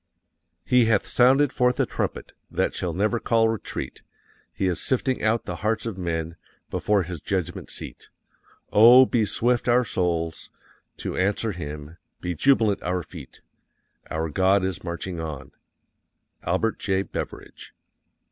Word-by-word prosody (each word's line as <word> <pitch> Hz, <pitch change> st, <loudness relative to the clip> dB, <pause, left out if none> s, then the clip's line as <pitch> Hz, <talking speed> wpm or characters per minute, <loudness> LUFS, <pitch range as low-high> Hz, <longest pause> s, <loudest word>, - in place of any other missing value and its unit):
"_HE 125 Hz, -2 st, +4 dB
HATH 110 Hz, -3 st, +2 dB
SOUNDED 135 Hz, +3 st, +4 dB
FORTH 125 Hz, 0 st, +1 dB
A -, -, +3 dB
TRUMPET -, -, -4 dB, 0.2 s
that -, -, -1 dB
shall -, -, -2 dB
never 105 Hz, +5 st, 0 dB
call 115 Hz, -1 st, +2 dB
retreat. 110 Hz, -1 st, -5 dB, 0.5 s
HE -, -, -2 dB
IS 90 Hz, -2 st, 0 dB
SIFTING 130 Hz, 0 st, 0 dB
OUT 115 Hz, +1 st, +1 dB
THE -, -, -5 dB
HEARTS 110 Hz, +2 st, -1 dB
OF 115 Hz, -4 st, -3 dB
MEN 85 Hz, -1 st, -3 dB, 0.3 s
before 105 Hz, -2 st, +1 dB
His 85 Hz, -3 st, -7 dB
judgment 95 Hz, -4 st, -3 dB
seat. -, -, -7 dB, 0.6 s
OH, 120 Hz, +5 st, +8 dB
BE 115 Hz, -3 st, +1 dB
SWIFT 120 Hz, +3 st, +1 dB
OUR 125 Hz, +1 st, +4 dB
SOULS 85 Hz, -5 st, -2 dB, 0.5 s
TO -, -, -5 dB
ANSWER 100 Hz, +4 st, 0 dB
HIM, 75 Hz, -2 st, -7 dB, 0.2 s
BE 90 Hz, -, -3 dB
JUBILANT 110 Hz, -, +3 dB
OUR 90 Hz, 0 st, -2 dB
FEET, 80 Hz, -7 st, -12 dB, 0.7 s
Our 80 Hz, +1 st, -2 dB
God 95 Hz, +4 st, +3 dB
is 95 Hz, -1 st, -3 dB
marching 85 Hz, +1 st, -5 dB
on_." 80 Hz, -4 st, -6 dB, 0.9 s
ALBERT 95 Hz, +6 st, -1 dB
J. 95 Hz, -1 st, 0 dB
BEVERIDGE. -, -, -8 dB
95 Hz, 140 wpm, -24 LUFS, 85-115 Hz, 0.9 s, OH